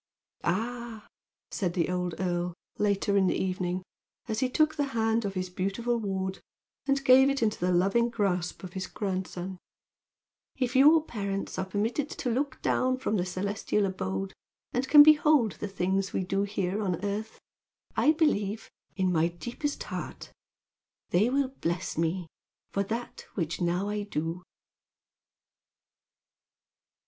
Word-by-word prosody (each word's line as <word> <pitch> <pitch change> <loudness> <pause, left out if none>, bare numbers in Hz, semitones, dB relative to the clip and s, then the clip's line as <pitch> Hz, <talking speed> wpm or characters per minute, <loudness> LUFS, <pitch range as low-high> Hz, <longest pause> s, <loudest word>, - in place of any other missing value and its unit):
"Ah," 235 -1 -2 0.5
said 180 -5 -1
the 175 0 +1
old 180 -2 -1
earl, 175 -1 -1 0.2
later 200 -1 +1
in 195 -1 +4
the - - +1
evening, 185 -1 -1 0.4
as 220 0 -1
he 260 -1 +1
took 310 +4 +3
the 290 -2 0
hand 225 0 +2
of 195 -1 -3
his 185 0 -1
beautiful 215 +6 -1
ward 190 -2 -2 0.5
and 275 0 +1
gave 265 +1 +7
it 275 -3 0
into 215 -1 0
the 180 +1 +1
loving 195 +7 +3
grasp 190 -7 -1
of 180 -1 -8
his 185 -1 -4
grandson, 185 -2 -4 1.0
"If 255 -1 -1
your 300 +4 +7
parents 200 -5 -3
are 190 - 0
permitted 225 +9 -1
to 250 - -3
look 265 +2 -1
down 255 0 +2
from 240 -4 -1
the 180 -3 +1
celestial 200 +3 -1
abode, 95 - -3 0.4
and 250 +2 0
can 295 +1 +10
behold 300 -6 +5
the 210 - -3
things 195 0 -1
we - - 0
do 195 +2 0
here 200 0 -1
on 185 -1 -1
earth, 210 +2 -4 0.6
I 300 - +5
believe, 220 -10 0 0.2
in 185 -2 +1
my 165 -1 +3
deepest 240 - -4
heart, - - -6 0.8
they 200 +7 +4
will 275 0 +1
bless 170 +2 -1
me 165 +3 0 0.5
for 200 - 0
that 230 +4 -5
which 170 -2 -2
now 175 +3 +1
I 210 0 -1
do!" 165 -3 -3
200 Hz, 145 wpm, -29 LUFS, 185-240 Hz, 1.0 s, can